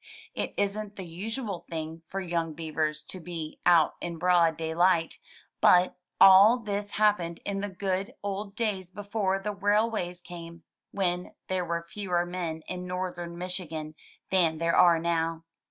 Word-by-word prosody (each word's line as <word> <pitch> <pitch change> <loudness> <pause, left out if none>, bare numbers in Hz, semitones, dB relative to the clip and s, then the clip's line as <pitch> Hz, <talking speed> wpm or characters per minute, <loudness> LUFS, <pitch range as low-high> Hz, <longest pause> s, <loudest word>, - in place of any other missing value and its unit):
It - - -3
isn't 205 +1 -2
the 190 - -7
usual 200 +2 -5
thing 160 0 -5
for 195 - -4
young 170 -3 -2
beavers 155 -1 -2
to 185 - -8
be 165 -3 -6
out 170 -3 +5
in 170 -1 -4
broad 170 -2 +3
daylight, 165 +1 +1 0.4
but 180 +1 +5 0.2
all 195 +5 +9
this 205 -3 -4
happened 205 -6 +2
in 200 -1 -2
the 205 - -3
good 190 0 -2
old 200 0 -4
days 200 -6 -1
before 200 0 -1
the 205 +2 -3
railways 205 -2 0
came, 170 -1 -10 0.3
when 180 -2 -2
there 185 -1 0
were 170 0 -2
fewer 180 -2 -1
men 170 -3 -4
in 180 0 -5
northern 180 -2 -4
Michigan 170 -4 -5 0.4
than 170 -4 +3
there 170 +1 +1
are 170 -2 +6
now. 165 0 -1
180 Hz, 150 wpm, -28 LUFS, 165-195 Hz, 0.4 s, all